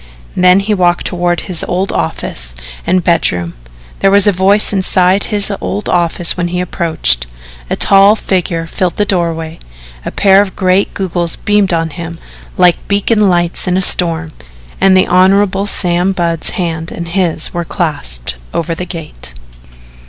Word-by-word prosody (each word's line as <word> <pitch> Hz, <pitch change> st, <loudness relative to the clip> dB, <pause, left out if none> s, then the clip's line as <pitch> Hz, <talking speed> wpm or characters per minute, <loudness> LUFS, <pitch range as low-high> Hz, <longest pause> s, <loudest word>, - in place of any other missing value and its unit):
Then 180 Hz, +1 st, +4 dB
he 210 Hz, +2 st, -1 dB
walked 175 Hz, -3 st, +1 dB
toward 175 Hz, -1 st, -1 dB
his 180 Hz, -5 st, -3 dB
old 185 Hz, +2 st, -2 dB
office -, -, -3 dB, 0.3 s
and 185 Hz, 0 st, +1 dB
bedroom. 90 Hz, -, 0 dB, 0.5 s
There 195 Hz, -, +3 dB
was 200 Hz, 0 st, +4 dB
a 205 Hz, -, +5 dB
voice 195 Hz, +3 st, +2 dB
inside 185 Hz, 0 st, +2 dB
his 205 Hz, -1 st, +2 dB
old 95 Hz, +3 st, -4 dB
office 170 Hz, -1 st, +1 dB
when 175 Hz, -1 st, -2 dB
he 180 Hz, +1 st, -3 dB
approached, 160 Hz, -, 0 dB, 0.4 s
a -, -, 0 dB
tall 200 Hz, +2 st, +5 dB
figure 180 Hz, -5 st, -2 dB
filled 175 Hz, +2 st, -2 dB
the 210 Hz, -, 0 dB
doorway, 165 Hz, -4 st, -2 dB, 0.4 s
a -, -, -4 dB
pair 195 Hz, 0 st, +4 dB
of 205 Hz, -2 st, -4 dB
great 185 Hz, +1 st, 0 dB
goggles 175 Hz, -3 st, -2 dB
beamed 205 Hz, -2 st, +1 dB
on 165 Hz, -1 st, -1 dB
him 170 Hz, 0 st, -7 dB, 0.4 s
like 180 Hz, -1 st, +4 dB
beacon 205 Hz, +1 st, +1 dB
lights 175 Hz, 0 st, -1 dB
in 180 Hz, 0 st, +1 dB
a -, -, +1 dB
storm, 165 Hz, -3 st, +1 dB, 0.5 s
and 190 Hz, -1 st, +5 dB
the 185 Hz, -, +3 dB
Hon. 195 Hz, +2 st, +2 dB
Sam 180 Hz, -1 st, +1 dB
Budd's 170 Hz, -3 st, -1 dB
hand 165 Hz, -2 st, -3 dB
and 170 Hz, -, -6 dB
his 170 Hz, -3 st, 0 dB
were 175 Hz, -1 st, -2 dB
clasped 65 Hz, -, -4 dB, 0.2 s
over 170 Hz, 0 st, -2 dB
the 180 Hz, +2 st, -6 dB
gate. 155 Hz, -, -9 dB
180 Hz, 160 wpm, -13 LUFS, 165-195 Hz, 0.5 s, a